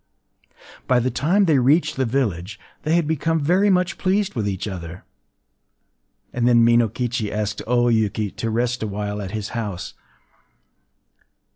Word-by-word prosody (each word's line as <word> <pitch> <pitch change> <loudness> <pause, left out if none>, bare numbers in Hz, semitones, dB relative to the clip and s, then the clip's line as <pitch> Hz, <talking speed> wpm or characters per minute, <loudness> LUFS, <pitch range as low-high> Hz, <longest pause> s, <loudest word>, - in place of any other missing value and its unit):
” - - -22
By 125 -1 +4
the 125 +2 0
time 180 - +2
they 155 -6 +3
reached 145 +7 +2
the 130 - 0
village, 105 -6 -2 0.2
they 155 +2 +1
had 170 -2 +2
become 160 +1 0
very 180 +7 +2
much 180 -1 +1
pleased 195 +1 0
with 105 -5 -1
each 95 +1 -4
other; 90 -3 -7 1.3
and 120 -1 +1
then 120 -1 +5
Minokichi 115 -1 +1
asked 105 -1 -3
O 120 0 +2
Yuki 110 -3 0
to 115 - -4
rest 120 +2 -1
awhile 105 -1 -3
at 95 - -5
his 105 0 -4
house. 105 -8 -5
120 Hz, 150 wpm, -22 LUFS, 105-145 Hz, 1.3 s, then